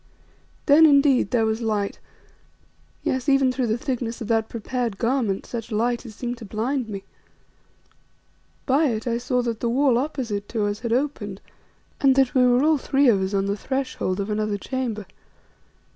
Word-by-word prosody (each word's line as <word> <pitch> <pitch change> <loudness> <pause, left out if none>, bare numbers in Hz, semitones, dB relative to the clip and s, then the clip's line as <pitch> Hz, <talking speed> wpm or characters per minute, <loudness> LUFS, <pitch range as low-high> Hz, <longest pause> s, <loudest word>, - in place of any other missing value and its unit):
Then, 315 +2 +7
indeed, 280 -2 +4
there 235 -3 +2
was 220 +1 -1
light, 210 -3 -1 1.0
yes, 260 +2 -1
even 275 -1 +4
through 255 -1 -1
the 220 +1 0
thicknesses 245 -3 -3
of - - -7
that 225 -1 +1
prepared 235 -2 -3
garment, 230 -5 0
such 235 0 -6
light 235 +3 -1
as 215 - -11
seemed 245 0 -4
to - - -9
blind 230 +4 -2
me. 195 -2 -6 1.6
By 285 +4 +3
it 220 -4 -2
I 235 -1 0
saw 250 0 0
that 230 -2 -3
the 235 - -1
wall 255 0 +3
opposite 245 -8 -3
to 220 -3 -1
us 205 0 -2
had 235 -1 -4
opened 235 -7 -2 0.6
and 270 -2 +4
that 270 0 +3
we 255 -3 +4
were 250 +1 +4
all 310 -1 +3
three 275 0 +3
of 200 -4 +3
us, 190 +1 -1
on 195 0 +1
the 200 0 -1
threshold 255 -5 -3
of 200 +2 -2
another 210 -1 -1
chamber. 230 -2 -4
240 Hz, 175 wpm, -23 LUFS, 215-265 Hz, 1.6 s, Then